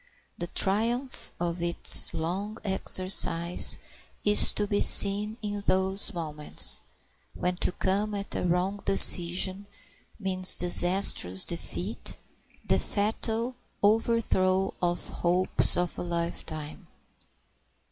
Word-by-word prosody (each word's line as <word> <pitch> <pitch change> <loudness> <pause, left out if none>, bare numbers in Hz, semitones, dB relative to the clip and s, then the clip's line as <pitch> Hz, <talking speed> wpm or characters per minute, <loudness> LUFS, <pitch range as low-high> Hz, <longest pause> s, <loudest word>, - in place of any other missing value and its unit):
The 175 - -8
triumph 230 +9 -3
of 170 0 -6
its 170 0 +3
long 190 +7 -7
exercise 185 -3 +1 0.5
is 210 0 +5
to 210 - -4
be 205 0 -4
seen 210 +2 +6
in 205 -1 -7
those 190 +1 +1
moments 155 -5 0 0.5
when 180 0 -5
to - - -2
come 205 +3 -5
at 200 0 -7
a - - -6
wrong 180 +3 -4
decision 185 +1 +5 0.5
means 185 -2 +2
disastrous 175 - 0
defeat, 175 +4 -7 0.5
the - - -2
fatal 225 +4 -5 0.3
overthrow 205 -3 -2
of 175 -1 -4
the - - -10
hopes 180 +1 -2
of 175 0 -5
a - - -6
life 170 -1 -7
time. 155 -2 -11
185 Hz, 110 wpm, -24 LUFS, 175-205 Hz, 0.5 s, seen